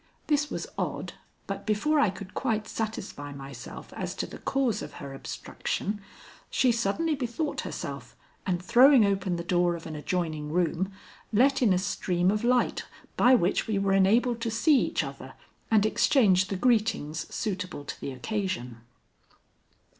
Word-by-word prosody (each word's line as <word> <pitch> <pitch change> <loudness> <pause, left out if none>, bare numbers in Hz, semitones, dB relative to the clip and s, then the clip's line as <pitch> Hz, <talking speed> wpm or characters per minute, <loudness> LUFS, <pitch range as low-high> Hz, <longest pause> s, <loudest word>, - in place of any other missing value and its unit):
This 295 -1 +1
was - - -4
odd, - - -3 0.3
but - - -5
before 290 +9 +2
I 250 - +4
could 190 +1 -8
quite 220 -5 -1
satisfy 210 -11 -4
myself 135 -3 -9
as - - -4
to - - -2
the - - -10
cause 255 -6 0
of - - -7
her 140 -1 -8
abstraction, 205 +8 -4 0.5
she 255 -2 +3
suddenly 235 +9 0
bethought 275 +2 -2
herself, - - -6 0.3
and 180 -2 0
throwing 250 +2 +7
open 195 -2 0
the 170 - -4
door 175 0 +2
of 165 - -9
an 155 - -6
adjoining 155 -1 -2
room, 180 +2 0 0.4
let 260 +6 +4
in 230 -5 +4
a 185 - +4
stream 180 -1 +1
of 210 +1 -1
light 245 +1 +2 0.3
by 255 +1 +6
which 185 -5 +1
we 215 -2 0
were 195 0 +1
enabled 230 +5 +3
to 230 - -1
see 270 +6 +4
each - - 0
other - - -8 0.3
and 215 -2 +4
exchange 200 -5 +4
the 195 - -3
greetings 215 -9 +1
suitable 185 -8 -4
to - - -7
the - - -3
occasion. 130 - -3
200 Hz, 160 wpm, -28 LUFS, 175-235 Hz, 0.5 s, throwing